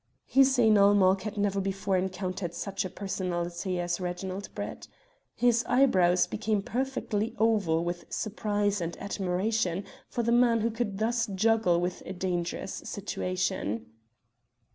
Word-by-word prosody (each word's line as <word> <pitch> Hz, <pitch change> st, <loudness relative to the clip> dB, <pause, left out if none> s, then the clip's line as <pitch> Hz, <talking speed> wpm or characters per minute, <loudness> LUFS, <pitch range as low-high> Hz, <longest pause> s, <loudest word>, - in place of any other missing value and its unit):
Hussein 260 Hz, -5 st, +5 dB
ul 200 Hz, +1 st, +6 dB
Mulk 190 Hz, -1 st, +4 dB
had 215 Hz, -1 st, -5 dB
never 200 Hz, -1 st, +1 dB
before 195 Hz, 0 st, -1 dB
encountered 185 Hz, -1 st, -2 dB
such 200 Hz, -1 st, -3 dB
a 185 Hz, -, -4 dB
personality 180 Hz, -1 st, -3 dB
as 175 Hz, 0 st, -1 dB
Reginald 185 Hz, +2 st, -4 dB
Brett. -, -, -6 dB, 0.5 s
His 240 Hz, -1 st, +3 dB
eyebrows 185 Hz, -9 st, +4 dB
became 210 Hz, -2 st, -1 dB
perfectly 235 Hz, -3 st, -2 dB
oval 205 Hz, -7 st, +2 dB
with 175 Hz, 0 st, -4 dB
surprise 205 Hz, -2 st, -1 dB
and 170 Hz, 0 st, -4 dB
admiration 195 Hz, 0 st, -1 dB, 0.3 s
for 240 Hz, -, -2 dB
the 235 Hz, -, +1 dB
man 235 Hz, -1 st, +4 dB
who 230 Hz, +2 st, +1 dB
could 220 Hz, -3 st, -3 dB
thus 235 Hz, +3 st, 0 dB
juggle 205 Hz, -3 st, +2 dB
with 180 Hz, +1 st, -2 dB
a 190 Hz, -, -4 dB
dangerous 180 Hz, 0 st, -3 dB
situation. 185 Hz, -, -3 dB
195 Hz, 135 wpm, -29 LUFS, 180-220 Hz, 0.5 s, ul